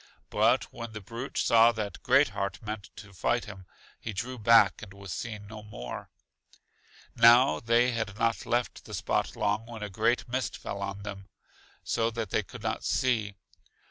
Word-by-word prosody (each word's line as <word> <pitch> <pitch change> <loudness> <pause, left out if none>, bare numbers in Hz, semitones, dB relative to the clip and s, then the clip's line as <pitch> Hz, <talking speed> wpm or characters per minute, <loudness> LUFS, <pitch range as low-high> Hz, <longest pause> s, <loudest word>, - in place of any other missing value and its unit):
But - - +2
when 115 -1 -7
the 110 - -5
brute 115 +6 -7
saw 115 0 +6
that 105 -4 -5
Great - - +4
heart 100 0 -3
meant 105 -2 -6
to 105 -2 -12
fight 120 +6 0
him, 95 -4 -10 0.3
he 110 - -5
drew 120 +5 -4
back 110 -4 +5
and 100 -3 -10
was 100 -2 -7
seen 105 -3 -5
no 110 +1 -9
more. 105 - -8 1.1
Now 120 +3 +6
they 120 +2 +3
had 110 -3 -3
not 115 0 0
left 120 0 -1
the - - -6
spot - - -1
long 105 +2 0
when 115 -3 -7
a 105 - -5
great 115 +5 +1
mist 125 +1 -2
fell 100 - -6
on 100 0 -4
them, 100 -2 -7 0.6
so 115 0 0
that 115 -4 -4
they - - +2
could - - -11
not - - -2
see. 110 -6 0
110 Hz, 175 wpm, -29 LUFS, 100-115 Hz, 1.1 s, saw